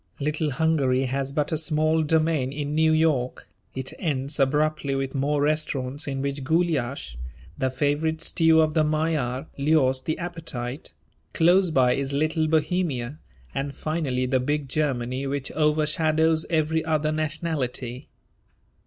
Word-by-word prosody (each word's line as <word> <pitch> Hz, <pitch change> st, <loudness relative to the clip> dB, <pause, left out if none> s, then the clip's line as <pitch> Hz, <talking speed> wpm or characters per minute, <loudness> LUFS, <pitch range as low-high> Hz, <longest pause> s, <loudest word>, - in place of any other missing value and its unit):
Little 150 Hz, +2 st, -1 dB
Hungary 135 Hz, -3 st, +1 dB
has 135 Hz, +1 st, -2 dB
but 150 Hz, +1 st, -1 dB
a 160 Hz, -, +1 dB
small 155 Hz, 0 st, +1 dB
domain 155 Hz, -3 st, +1 dB
in 145 Hz, 0 st, -3 dB
New 160 Hz, +1 st, +3 dB
York; 155 Hz, -6 st, +1 dB, 0.3 s
it 130 Hz, 0 st, -3 dB
ends 145 Hz, -3 st, -2 dB
abruptly 145 Hz, 0 st, +1 dB
with 135 Hz, -1 st, -2 dB
more 145 Hz, +1 st, 0 dB
restaurants 145 Hz, -2 st, -1 dB
in 135 Hz, -1 st, -2 dB
which 140 Hz, 0 st, -3 dB
gulyas, 140 Hz, -, 0 dB, 0.4 s
the 130 Hz, -, 0 dB
favourite 150 Hz, +4 st, 0 dB
stew 160 Hz, -1 st, +3 dB
of 155 Hz, -1 st, +1 dB
the 155 Hz, -1 st, +3 dB
Magyar, 150 Hz, -5 st, 0 dB
lures 140 Hz, -3 st, +3 dB
the 155 Hz, -, -2 dB
appetite; 150 Hz, -, -5 dB, 0.4 s
close 180 Hz, +3 st, +4 dB
by 130 Hz, -5 st, +3 dB
is 140 Hz, 0 st, -2 dB
Little 155 Hz, +2 st, +1 dB
Bohemia, 155 Hz, -4 st, 0 dB, 0.3 s
and 140 Hz, +1 st, -3 dB
finally 145 Hz, -5 st, -1 dB
the 130 Hz, 0 st, +1 dB
big 145 Hz, +2 st, -1 dB
Germany 130 Hz, -2 st, -1 dB
which 140 Hz, 0 st, -2 dB
overshadows 155 Hz, +1 st, +2 dB
every 160 Hz, -1 st, +1 dB
other 155 Hz, -1 st, 0 dB
nationality. 150 Hz, -5 st, -3 dB
150 Hz, 135 wpm, -25 LUFS, 135-160 Hz, 0.4 s, close